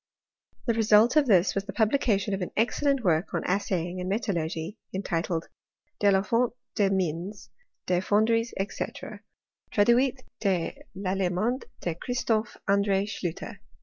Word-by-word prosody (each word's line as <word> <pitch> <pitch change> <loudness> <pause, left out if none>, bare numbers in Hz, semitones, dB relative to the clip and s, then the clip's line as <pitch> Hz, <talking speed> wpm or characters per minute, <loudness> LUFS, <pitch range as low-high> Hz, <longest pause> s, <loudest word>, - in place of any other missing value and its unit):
The 235 - +2
result 225 +2 +5
of 300 -3 +4
this 190 -4 +4
was 195 0 -2
the 195 - -6
publication 215 -4 +1
of 195 - -2
an 180 - -2
excellent 270 +4 +1
work 170 -1 +1
on - - -1
assaying 180 -2 -1
and 180 - -3
metalluigy, 175 -3 -2 0.2
entitled 170 -3 -2 0.5
De 205 - +4
la 190 0 +3
Fonte 235 +3 +1 0.2
des 205 -3 +2
Mines, 185 +1 -2 0.3
dea 180 -1 +2
FonderieSy 225 +4 +2 0.2
&c. - - -2 0.9
Traduit 250 +5 +3 0.2
de 185 -5 -1 0.2
I'Allemand 195 +5 -1 0.2
de 170 - -1
Christophe 225 +3 -1
Andre 200 -1 +2
Schlutter." 180 -5 -5
200 Hz, 135 wpm, -27 LUFS, 180-230 Hz, 0.9 s, result